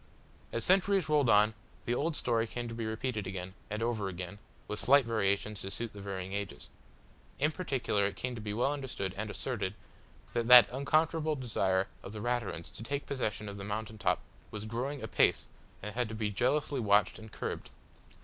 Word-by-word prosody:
As 115 - -1
centuries 190 -2 +3
rolled 150 -5 +3
on, 105 +1 +5 0.3
the 120 - +1
old 150 +5 0
story 115 -4 +1
came 120 +2 -4
to 115 - -6
be 115 -1 -3
repeated 110 -2 -2
again, 95 -1 -5 0.2
and 105 +1 -2
over 115 -4 0
again, 90 +2 -6 0.3
with 105 - -3
slight 140 0 +6
variations 105 -2 0
to 95 - -4
suit 115 +3 -5
the 100 - -9
varying 95 -1 -5
ages. 100 -1 -5 0.7
In 150 +3 +2
particular 135 - 0
it 100 - -5
came 125 0 -3
to 115 - -6
be 105 -1 -4
well 120 +7 +1
understood, 130 -9 -4
and 105 +1 -3
asserted, 105 -4 -3 0.6
that 120 -1 0
that 125 -1 +11
unconquerable 155 +3 +2
desire 95 -7 +1
of 95 - -8
the 110 - -5
Raturans 115 -7 -2
to - - -9
take 140 +5 -3
possession 110 -6 -2
of 100 0 -6
the 100 - -6
mountain 110 +1 -4
top - - +1 0.3
was 105 0 -6
growing 130 +5 -3
apace - - +2 0.3
and 105 +1 -5
had 120 -1 -1
to 110 - -5
be 110 -1 -1
jealously 135 +6 +1
watched 105 -3 +3
and 110 0 -11
curbed. - - -4
110 Hz, 190 wpm, -32 LUFS, 100-130 Hz, 0.7 s, that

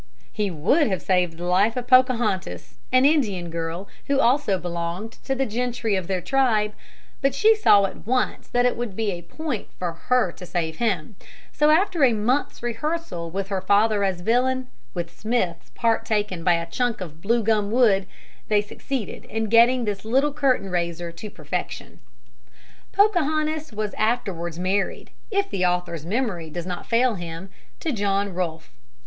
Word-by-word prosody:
He 210 -2 -1
would 190 - +2
have 190 -3 0
saved 180 -3 +1
the 175 - -7
life 195 +6 +2
of 245 - -2
Pocahontas, 245 -6 +2
an 255 +1 +5
Indian 205 - +2
girl 165 +3 -4 0.2
who 280 -1 +2
also 245 -5 +3
belonged 175 +4 -4
to 270 - 0
the 270 +1 0
gentry 235 -2 -1
of 185 -3 -2
their 185 -2 -1
tribe, 215 -1 +2 0.5
but 275 -1 +1
she 440 +9 +5
saw 205 - +5
at 195 - -8
once 255 +1 0
that 245 0 +1
it 250 - +2
would 235 -5 -4
be 220 -1 0
a 175 -2 -5
point 260 - -5
for 180 -2 -2
her 245 +3 +1
to 180 - -13
save 160 -2 -2
him, 195 -5 -1 0.3
so 300 0 +3
after 340 0 +3
a 250 -3 +6
month's 235 +5 0
rehearsal 240 - -3
with 195 +3 -4
her 195 -2 -1
father 205 +2 +3
as 190 -3 -1
villain, 255 +5 +1 0.3
with 170 -1 -4
Smith's 210 -7 -1
part 230 -1 +1
taken 205 -5 -1
by 175 0 +4
a 170 0 -2
chunk 240 +7 -1
of 160 -4 -8
blue 230 +4 +1
gum 210 -2 +2
wood, 210 -5 +3 0.4
they 210 -1 +3
succeeded 245 +2 -5
in 220 0 -3
getting 235 +2 +5
this 205 -2 -3
little 270 +6 +2
curtain 255 -10 +1
raiser 170 -1 -2
to 170 +6 -8
perfection. 155 -7 -5 0.9
Pocahontas 315 - +1
was 210 -1 -3
afterwards 185 -7 -1
married, 190 +2 -1 0.2
if 400 -2 +1
the 185 - -1
author's 175 -3 -1
memory 195 -7 -2
does 170 +2 -5
not 180 -1 -5
fail 240 +1 +3
him, 175 0 -7 0.3
to 320 - -2
John 200 -3 0
Rolfe. 165 -3 -4
210 Hz, 170 wpm, -24 LUFS, 180-250 Hz, 0.9 s, a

